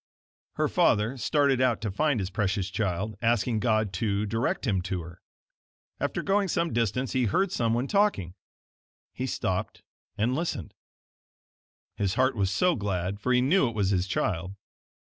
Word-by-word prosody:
Her - - +1
father 105 +5 +2
started 140 0 +2
out 125 -4 +2
to 105 -2 -2
find 145 +4 +1
his 95 -1 -3
precious 95 -1 -1
child, 100 +1 -2
asking 115 -1 +1
God 110 -3 +1
to 105 -2 0
direct 115 +4 -1
him 95 -4 +1
to 90 -1 -3
her. 85 +1 -12 0.8
After - - -2
going 200 0 +2
some 170 -2 0
distance, 120 +3 0
he 130 -1 +2
heard 185 - +1
someone 120 -3 0
talking. 195 - +1 0.8
He 130 - -3
stopped 95 -6 -3 0.3
and 115 +4 +1
listened. 145 - -3 1.2
His 100 -1 0
heart 130 +1 +2
was 100 -3 +1
so 180 - +2
glad, 100 -2 -2
for 125 +5 -1
he 125 0 +4
knew 140 +1 +3
it 115 - -9
was 100 -2 +1
his 95 -1 +1
child. 95 -1 -2
110 Hz, 160 wpm, -27 LUFS, 95-130 Hz, 1.2 s, he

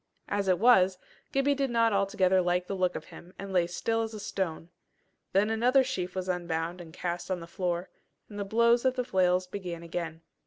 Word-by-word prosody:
As 200 -1 -1
it 185 -1 +4
was, 190 -5 +5 0.3
Gibbie 275 +1 +2
did 275 -1 -1
not 230 -2 +3
altogether 190 -1 +3
like 180 0 +1
the 195 - -4
look 185 -1 0
of - - -5
him, 175 +2 -13
and 195 0 -7
lay 175 -2 +3
still 225 +6 -1
as 225 -1 -4
a - - -6
stone. 175 -5 -3 0.6
Then 205 +3 +2
another 250 +4 +4
sheaf 185 -8 -3
was 185 0 -3
unbound 175 -1 -2
and 165 -2 -11
cast 175 +2 -4
on 185 -1 -1
the 165 - -8
floor, 175 0 -2 0.4
and 205 -1 -8
the - - 0
blows 235 +4 +3
of 260 -1 +2
the 250 -1 -1
flails 185 -2 +2
began 180 -3 -6
again. 165 -1 -5
185 Hz, 205 wpm, -29 LUFS, 175-225 Hz, 0.6 s, was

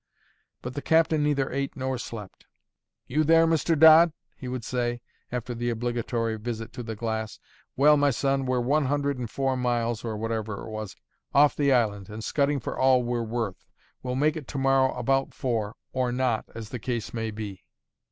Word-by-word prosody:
But 125 - -5
the 145 - -4
captain 160 -1 +3
neither 145 -2 +1
ate 140 +1 -2
nor 130 -1 -2
slept. 105 -5 -8 0.6
"You 155 +4 +1
there, 165 +2 +5
Mr. 165 0 +2
Dodd?" 160 +1 +8 0.2
he 130 - -8
would 125 -2 -4
say, 120 0 -2 0.3
after 125 0 -3
the 120 +1 -2
obligatory 115 -1 -2
visit 115 0 -5
to - - -6
the 110 -2 -5
glass. 110 -1 -3 0.4
"Well, 150 +2 +6
my 145 0 +3
son, 135 +1 0
we're 125 -1 +1
one 145 +4 +2
hundred 140 0 0
and 120 -3 -4
four 135 +1 0
miles" 120 -2 -1
(or 110 -2 -3
whatever 110 -2 -3
it - - -8
was) 110 -2 -6 0.4
"off 145 +1 +6
the 140 -1 +2
island, 105 -6 +1
and 105 +1 -7
scudding 140 +1 +1
for 115 - -5
all 130 -1 +4
we're 120 0 -1
worth. 115 -4 -3 0.4
We'll 125 0 -3
make 150 +3 +2
it 150 -5 -7
to 145 - -5
morrow 135 -1 +3
about 135 0 0
four, 115 -5 -2 0.2
or 130 -1 0
not, 125 -3 0
as 110 -2 -7
the 125 - -5
case 120 -1 -3
may 115 -1 -2
be. 105 -3 -7
125 Hz, 190 wpm, -26 LUFS, 115-140 Hz, 0.6 s, Dodd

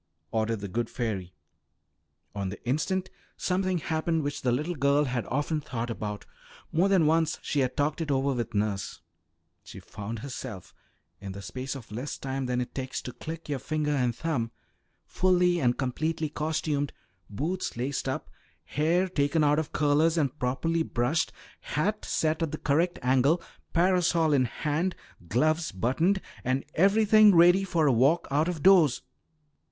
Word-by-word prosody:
ordered 110 -1 -1
the 100 - -4
good 115 +4 -2
fairy. 100 -7 -4 1.0
On 100 -2 -3
the 105 +5 -9
instant 185 +8 -1 0.3
something 185 0 0
happened 160 0 -1
which 145 0 -3
the 125 - +1
little 150 +8 -1
girl 140 -1 +3
had 125 -4 -2
often 150 +3 -1
thought 120 -3 -4
about; 105 -2 -5 0.5
more 180 +5 +3
than 190 -5 +4
once 160 +1 +2
she 145 - -1
had 130 -2 0
talked 145 +3 0
it 160 - -3
over 135 0 +1
with 120 -4 -3
nurse. 100 -1 -2 0.6
She - - -10
found 105 +3 -7
herself, 125 -8 -7 0.5
in 100 -1 -7
the 100 - -8
space 130 +5 -5
of 125 -6 -10
less 125 +7 -4
time 135 -1 -3
than 125 0 0
it 125 - -5
takes 130 -1 -4
to 125 - -6
click 165 +1 -7
your 145 -3 -2
finger 150 +2 -1
and 125 -5 +1
thumb, 140 -8 -1 0.6
fully 180 -1 +2
and 125 -4 +2
completely 155 +4 -1
costumed, 150 -1 -1 0.4
boots 160 - -3
laced 135 +2 -2
up, 130 - -3 0.4
hair 170 +6 +1
taken 155 -2 +1
out 150 +1 +3
of 160 - -4
curlers 150 +3 +2
and 150 -2 0
properly 165 +7 0
brushed, 150 +2 0 0.3
hat 210 +8 -2
set 160 +1 0
at 165 -3 -1
the 155 - -3
correct 165 +5 +1
angle, 135 +6 +3 0.3
parasol 170 -3 +3
in 130 -3 +4
hand, 155 +9 -1 0.3
gloves 155 +7 +1
buttoned, 145 - +1 0.2
and 130 +2 0
everything 210 +2 +5
ready 175 +3 +6
for 170 -5 +1
a 140 - +4
walk 140 +9 +3
out 150 +4 +2
of 170 -5 -3
doors. 175 -9 +5
145 Hz, 160 wpm, -28 LUFS, 125-165 Hz, 1.0 s, ready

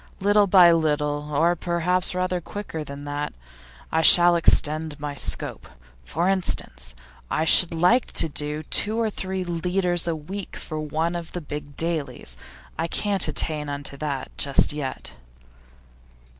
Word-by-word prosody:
Little 205 +1 +3
by 180 -2 +7
little 150 -2 -1
or 165 +4 +2
perhaps 180 +2 -1
rather 180 -1 -1
quicker 170 -4 -7
than 140 0 -9
that 145 0 -4 0.6
I 160 - +1
shall 175 +1 +7
extend 155 -2 +2
my 145 0 -5
scope. 140 - +1 0.4
For 165 - -2
instance, 175 - -2 0.3
I 155 - -1
should 170 +2 +5
like 180 +10 +2
to - - +3
do 150 0 -3
two 215 +8 +2
or 225 -2 0
three 190 -1 -4
leaders 175 0 -1
a 165 - -1
week 185 +6 -8
for 155 -1 -7
one 160 +3 -2
of 170 -1 -7
the 175 - -4
big 145 -1 -8
dailies. 150 - -2 0.4
I 165 - -1
can't 200 +1 +2
attain 150 -1 0
unto 140 0 -5
that 140 -3 -5
just 140 +1 +2
yet. 140 -3 -6
160 Hz, 145 wpm, -23 LUFS, 150-180 Hz, 0.6 s, by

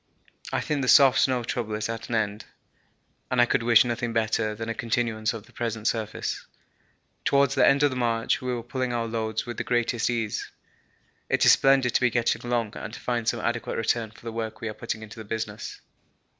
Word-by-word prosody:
I - - 0
think 150 -2 -1
the 130 - -1
soft 135 -1 +7
snow 125 -2 +2
trouble 115 -3 -3
is 105 0 -2
at 115 0 -5
an 120 - -1
end, 105 -1 -1 0.8
and 125 - 0
I 120 - +7
could 120 - +1
wish 115 0 +5
nothing 120 -1 -2
better 110 -1 0
than 115 +1 -5
a 115 - -1
continuance 115 -1 -1
of 115 -3 -8
the - - -21
present 115 -2 -3
surface. 110 -2 -2 0.8
Towards 140 -1 +3
the 135 - +4
end 140 +1 +4
of 145 - +4
the - - -4
march 115 -2 0
we 125 0 -2
were 120 -2 -3
pulling 125 0 -2
our 115 -1 -1
loads 110 -1 -2
with 120 -1 -6
the - - -2
greatest 120 -1 0
ease. 115 -3 -2 0.8
It - - +3
is - - +9
splendid 135 -2 +4
to - - +2
be 125 - +4
getting 120 0 0
along 120 -3 -1
and 105 - -6
to - - -9
find 120 -2 -2
some - - 0
adequate 115 0 -2
return 115 0 0
for 110 - -18
the 115 - -6
work 110 -1 -4
we 115 - -4
are - - -5
putting 110 0 -5
into 110 +1 -10
the - - -6
business. 110 0 -5
115 Hz, 220 wpm, -26 LUFS, 110-120 Hz, 0.8 s, is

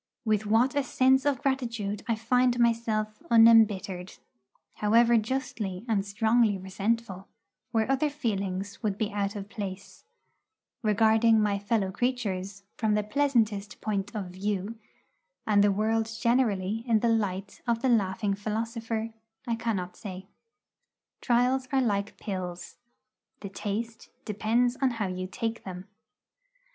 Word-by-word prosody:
With 215 -1 +1
what 230 +6 +3
a 285 - +2
sense 265 0 +3
of 275 -3 0
gratitude 230 -7 -2
I 230 - +1
find 245 +2 +2
myself 225 -1 0
unembittered 215 -5 +4 0.6
however 230 +3 +4
justly 220 -4 -2
and 210 -4 +1
strongly 220 +1 +2
resentful, 195 +1 -3 0.4
where 225 -2 +1
other 270 +3 +1
feelings 200 -8 -3
would 205 -4 -1
be 215 0 -1
out 200 0 -2
of 200 -1 -6
place 195 -3 -7 0.8
regarding 220 +1 +4
my 205 -1 +1
fellow 205 -2 0
creatures 200 -4 -2
from 215 -2 +1
the 210 - +1
pleasantest 215 -5 0
point 205 -1 -3
of 195 -4 -4
view, 200 +3 -3 0.7
and 205 -2 +4
the 205 - +4
world 220 +2 +1
generally 225 -4 +1
in 225 -2 +3
the 235 - +2
light 200 -3 -1
of 235 -1 0
the 260 - +3
laughing 200 -2 +1
philosopher, 225 +2 -3 0.3
I 235 - -1
cannot 195 -6 -3
say. 190 -2 -8 1.0
Trials 250 +2 +2
are 270 - +3
like 205 -5 -1
pills. 180 -4 -6 0.6
The 200 - -6
taste 220 +3 -5 0.2
depends 230 +4 +1
upon 265 -2 +1
how 210 - -1
you 185 0 -4
take 225 +4 -4
them. 185 -1 -7
215 Hz, 130 wpm, -28 LUFS, 200-235 Hz, 1.0 s, unembittered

